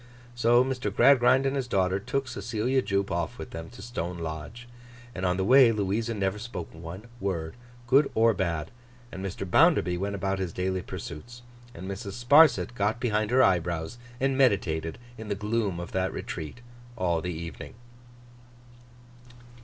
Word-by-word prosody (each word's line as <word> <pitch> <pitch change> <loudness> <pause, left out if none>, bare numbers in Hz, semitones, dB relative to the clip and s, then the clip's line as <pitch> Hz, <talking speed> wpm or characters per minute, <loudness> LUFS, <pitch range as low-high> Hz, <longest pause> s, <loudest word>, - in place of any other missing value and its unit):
So, 120 +1 +4
Mr. 130 -5 -2
Gradgrind 130 +3 +5
and 135 +1 0
his 135 -2 -2
daughter 95 -3 +1
took 135 +6 -2
Cecilia 120 +4 -1
Jupe 100 -3 -1
off 85 -1 -2
with - - -8
them 80 0 -7
to 95 - -12
Stone 90 -7 -4
Lodge, 80 +9 -7 0.5
and 95 -3 -2
on 90 0 +1
the 95 - 0
way 130 +1 +7
Louisa 110 +2 -1
never 100 0 -1
spoke 105 -6 -7
one 85 +5 -9 0.2
word, 85 -6 -3 0.3
good 135 +4 +4
or 115 +1 +4
bad. 85 -5 -2 0.4
And 95 0 -7
Mr. 95 0 -4
Bounderby 95 - +4
went 100 +1 -2
about 95 0 -2
his 90 -3 -3
daily 95 0 -1
pursuits. 120 +11 -8 0.3
And 95 - -8
Mrs. 100 +1 -5
Sparsit 135 +4 +5
got 105 0 0
behind 110 -3 0
her 130 +2 +5
eyebrows 85 +2 0 0.2
and 135 0 +1
meditated 90 -11 +1 0.2
in 110 - -7
the 100 - -1
gloom 105 -3 -1
of 85 - -7
that 95 0 0
retreat, 80 +10 -6 0.4
all 85 -5 0
the 90 +2 -3
evening. 85 - -8
100 Hz, 160 wpm, -27 LUFS, 90-120 Hz, 0.5 s, way